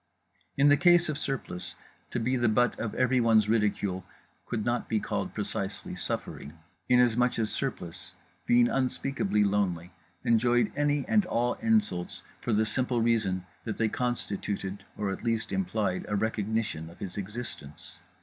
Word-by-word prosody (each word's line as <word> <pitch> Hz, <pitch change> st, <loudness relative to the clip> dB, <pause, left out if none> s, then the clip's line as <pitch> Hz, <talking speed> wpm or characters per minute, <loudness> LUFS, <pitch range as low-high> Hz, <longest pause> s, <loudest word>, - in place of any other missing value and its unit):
In 140 Hz, +1 st, +6 dB
the 145 Hz, -, +6 dB
case 175 Hz, -2 st, +6 dB
of 150 Hz, -, -1 dB
Surplice, 130 Hz, -10 st, -4 dB, 0.3 s
to 120 Hz, -, -2 dB
be 125 Hz, +3 st, +1 dB
the 120 Hz, -2 st, +2 dB
butt 120 Hz, +3 st, +2 dB
of 110 Hz, -, -3 dB
everyone's 115 Hz, -4 st, +4 dB
ridicule 105 Hz, -4 st, +1 dB, 0.4 s
could 110 Hz, -3 st, -2 dB
not 120 Hz, 0 st, -1 dB
be 110 Hz, -, +2 dB
called -, -, -3 dB
precisely -, -, -3 dB
suffering; 75 Hz, +4 st, -5 dB, 0.3 s
inasmuch 125 Hz, 0 st, +4 dB
as 110 Hz, -2 st, 0 dB
Surplice, 90 Hz, -11 st, -4 dB, 0.4 s
being 120 Hz, 0 st, +5 dB
unspeakably 135 Hz, -, 0 dB
lonely, 95 Hz, -4 st, 0 dB, 0.3 s
enjoyed 120 Hz, 0 st, +3 dB
any 145 Hz, -1 st, +1 dB
and 210 Hz, -4 st, +3 dB
all 120 Hz, -4 st, +1 dB
insults 215 Hz, -, +1 dB, 0.2 s
for -, -, -2 dB
the 110 Hz, 0 st, +3 dB
simple 125 Hz, +2 st, 0 dB
reason 110 Hz, -6 st, +1 dB, 0.2 s
that 110 Hz, -3 st, -4 dB
they 110 Hz, -1 st, +2 dB
constituted 100 Hz, -5 st, -2 dB
or 100 Hz, -2 st, -1 dB
at 95 Hz, -, -6 dB
least 115 Hz, -1 st, -1 dB
implied 110 Hz, -, -1 dB
a 105 Hz, -, 0 dB
recognition 110 Hz, -5 st, -1 dB
of 85 Hz, -, -14 dB
his 95 Hz, -4 st, -6 dB
existence. 100 Hz, -8 st, -7 dB
115 Hz, 150 wpm, -29 LUFS, 100-125 Hz, 0.4 s, In